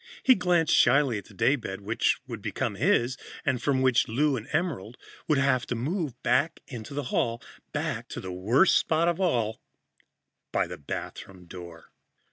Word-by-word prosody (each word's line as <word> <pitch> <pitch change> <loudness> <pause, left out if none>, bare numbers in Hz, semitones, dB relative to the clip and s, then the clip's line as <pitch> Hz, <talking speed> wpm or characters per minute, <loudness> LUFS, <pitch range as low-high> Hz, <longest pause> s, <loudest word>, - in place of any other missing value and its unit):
He 260 - +7
glanced 180 -6 +2
shyly 125 -3 +4
at - - -13
the - - -16
daybed, 105 -4 0
which 110 +3 +1
would 115 -5 -7
become 110 +3 -2
his, 130 - +1 0.3
and 130 -4 0
from 130 0 +1
which 125 -2 +3
Lou 140 +5 +1
and 115 -1 -6
Emerald 145 - -2 0.3
would 150 -3 +3
have 130 -3 +2
to 125 - -2
move 150 - -2
back 145 +5 +2
into 120 +1 -8
the 145 - -2
hall, 120 - +1 0.3
back - - -3
to - - -6
the 95 - -6
worst 110 - +3
spot 160 +1 +1
of 175 +1 0
all 115 - 0 0.9
by - - +1
the - - -8
bathroom 90 +5 -7
door. 85 -2 -11
130 Hz, 170 wpm, -27 LUFS, 110-150 Hz, 0.9 s, He